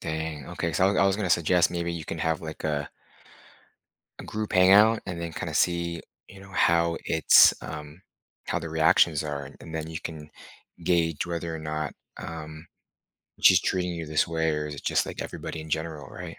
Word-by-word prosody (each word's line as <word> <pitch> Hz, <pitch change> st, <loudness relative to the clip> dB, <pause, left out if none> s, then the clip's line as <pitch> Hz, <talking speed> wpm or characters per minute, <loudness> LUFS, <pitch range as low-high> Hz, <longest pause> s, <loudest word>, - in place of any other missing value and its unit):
Dang, 80 Hz, -2 st, -4 dB
okay. 85 Hz, -, -3 dB
So, 95 Hz, +6 st, +3 dB
I -, -, +4 dB
I 100 Hz, -, +4 dB
was 95 Hz, -, +2 dB
gonna 100 Hz, -4 st, -2 dB
suggest 85 Hz, +1 st, +3 dB
maybe 85 Hz, -1 st, -2 dB
you 80 Hz, -2 st, -6 dB
can 85 Hz, -, -5 dB
have, 80 Hz, 0 st, 0 dB
like, 80 Hz, -1 st, -8 dB
a 75 Hz, -2 st, -2 dB, 1.3 s
a -, -, -8 dB
group 105 Hz, 0 st, -4 dB
hangout 100 Hz, +5 st, +6 dB
and 85 Hz, -2 st, -5 dB
then 85 Hz, -, -4 dB
kinda -, -, -5 dB
see, 85 Hz, -1 st, 0 dB, 0.3 s
you 95 Hz, -, -13 dB
know, 95 Hz, 0 st, -14 dB
how 85 Hz, -2 st, +2 dB
it's, 80 Hz, -, +6 dB
um, 75 Hz, +2 st, -8 dB, 0.5 s
how -, -, 0 dB
the 80 Hz, -, -6 dB
reactions 80 Hz, -1 st, +3 dB
are. 75 Hz, -2 st, -5 dB
And 80 Hz, -, -10 dB
then 80 Hz, 0 st, -4 dB
you 80 Hz, -, -5 dB
can 75 Hz, -2 st, -8 dB, 0.5 s
gauge 85 Hz, -2 st, +1 dB
whether 85 Hz, -1 st, -4 dB
or -, -, -6 dB
not, 75 Hz, -1 st, -4 dB, 0.2 s
um, 80 Hz, 0 st, -8 dB, 0.7 s
she's -, -, +6 dB
treating 90 Hz, -1 st, -1 dB
you 85 Hz, -1 st, -5 dB
this 75 Hz, 0 st, +1 dB
way 80 Hz, -1 st, 0 dB
or 75 Hz, 0 st, -2 dB
is 75 Hz, -, -6 dB
it -, -, -10 dB
just -, -, +1 dB
like -, -, -6 dB
everybody 80 Hz, -, -6 dB
in 80 Hz, -, -10 dB
general, 80 Hz, -3 st, -3 dB
right? 90 Hz, 0 st, -9 dB
80 Hz, 195 wpm, -26 LUFS, 80-85 Hz, 1.3 s, hangout